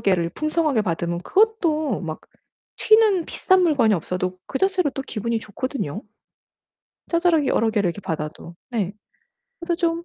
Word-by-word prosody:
개를 180 Hz, -4 st, +2 dB
풍성하게 305 Hz, -, 0 dB
받으면 170 Hz, -1 st, -2 dB
그것도 325 Hz, -, +1 dB
막 160 Hz, -4 st, -5 dB, 0.6 s
튀는 435 Hz, -5 st, +4 dB
비싼 375 Hz, +2 st, +2 dB
물건이 265 Hz, -11 st, +3 dB
없어도 180 Hz, +1 st, -3 dB
그 265 Hz, -, -3 dB
자체로 380 Hz, -6 st, +2 dB
또 270 Hz, -, -5 dB
기분이 230 Hz, -2 st, -2 dB
좋거든요. 215 Hz, -, -4 dB, 1.1 s
자잘하게 335 Hz, -3 st, +3 dB
여러 225 Hz, 0 st, +2 dB
개를 205 Hz, -4 st, +1 dB
이렇게 175 Hz, +4 st, -4 dB
받아도. 160 Hz, -1 st, -5 dB, 0.2 s
네. 205 Hz, -5 st, -1 dB, 0.7 s
그래서 340 Hz, 0 st, -1 dB
좀 335 Hz, -1 st, -1 dB
255 Hz, 325 characters per minute, -23 LUFS, -, 1.1 s, 튀는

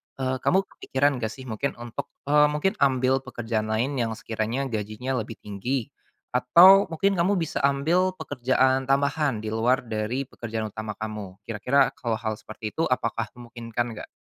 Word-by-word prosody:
eee, 130 Hz, -1 st, -2 dB
kamu 190 Hz, +8 st, +2 dB
kepikiran 140 Hz, -6 st, -1 dB
nggak 110 Hz, -, -1 dB
sih 130 Hz, -, -10 dB
mungkin 125 Hz, +2 st, -3 dB
untuk, 120 Hz, -1 st, -6 dB, 0.2 s
eee, 150 Hz, +1 st, +5 dB
mungkin 150 Hz, +6 st, +1 dB
ambil 130 Hz, -1 st, +3 dB
pekerjaan 115 Hz, -4 st, -3 dB
lain 125 Hz, +6 st, 0 dB
yang 115 Hz, -2 st, -1 dB
sekiranya 115 Hz, +4 st, -2 dB
gajinya 110 Hz, +4 st, -3 dB
lebih 110 Hz, +1 st, -6 dB
tinggi 110 Hz, +5 st, -3 dB, 0.4 s
atau 175 Hz, +11 st, +7 dB
mungkin 190 Hz, +3 st, 0 dB
kamu 185 Hz, +4 st, +3 dB
bisa 165 Hz, -4 st, -2 dB
ambil 170 Hz, +7 st, +1 dB
pekerjaan 130 Hz, -3 st, +1 dB
tambahan 140 Hz, -3 st, +1 dB
di 110 Hz, -, -3 dB
luar 120 Hz, +4 st, +2 dB
dari 115 Hz, +3 st, -2 dB
pekerjaan 110 Hz, -4 st, -5 dB
utama 110 Hz, 0 st, -5 dB
kamu. 105 Hz, -3 st, -6 dB
Kira-kira 115 Hz, +6 st, +2 dB
kalau 115 Hz, -3 st, -1 dB
hal 110 Hz, -1 st, -4 dB
seperti 110 Hz, 0 st, -7 dB
itu 160 Hz, -, -1 dB
apakah 115 Hz, -3 st, -1 dB
memungkinkan 120 Hz, 0 st, -4 dB
nggak? 105 Hz, -, -8 dB
125 Hz, 160 wpm, -25 LUFS, 110-140 Hz, 0.4 s, atau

